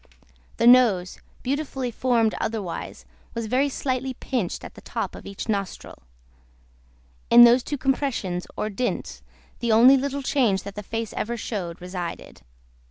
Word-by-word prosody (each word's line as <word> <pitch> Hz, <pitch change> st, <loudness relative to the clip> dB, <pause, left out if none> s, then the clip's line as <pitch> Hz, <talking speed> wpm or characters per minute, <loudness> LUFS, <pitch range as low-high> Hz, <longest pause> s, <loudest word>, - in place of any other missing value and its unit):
The 230 Hz, -, +1 dB
nose, 235 Hz, -8 st, +5 dB, 0.2 s
beautifully 265 Hz, -2 st, -2 dB
formed 230 Hz, -2 st, +1 dB
otherwise, 205 Hz, -6 st, -4 dB, 0.3 s
was 230 Hz, -1 st, -2 dB
very 260 Hz, +6 st, +1 dB
slightly 260 Hz, -1 st, -2 dB
pinched 235 Hz, -10 st, -3 dB
at -, -, -9 dB
the -, -, -13 dB
top -, -, -4 dB
of -, -, -10 dB
each 200 Hz, -, -6 dB
nostril. 200 Hz, -3 st, -4 dB, 1.3 s
In 240 Hz, 0 st, +9 dB
those 240 Hz, +2 st, +7 dB
two 290 Hz, +4 st, -4 dB
compressions, 255 Hz, -10 st, -1 dB
or 215 Hz, -, -2 dB
dints, 245 Hz, +5 st, -3 dB, 0.4 s
the 235 Hz, -1 st, 0 dB
only 245 Hz, +5 st, +7 dB
little 280 Hz, +1 st, -3 dB
change 240 Hz, -9 st, +1 dB
that 200 Hz, -, -7 dB
the 210 Hz, -, -6 dB
face 225 Hz, +2 st, -4 dB
ever 235 Hz, +2 st, -3 dB
showed, 180 Hz, -7 st, -5 dB
resided. 180 Hz, -1 st, -7 dB
235 Hz, 145 wpm, -24 LUFS, 200-260 Hz, 1.3 s, In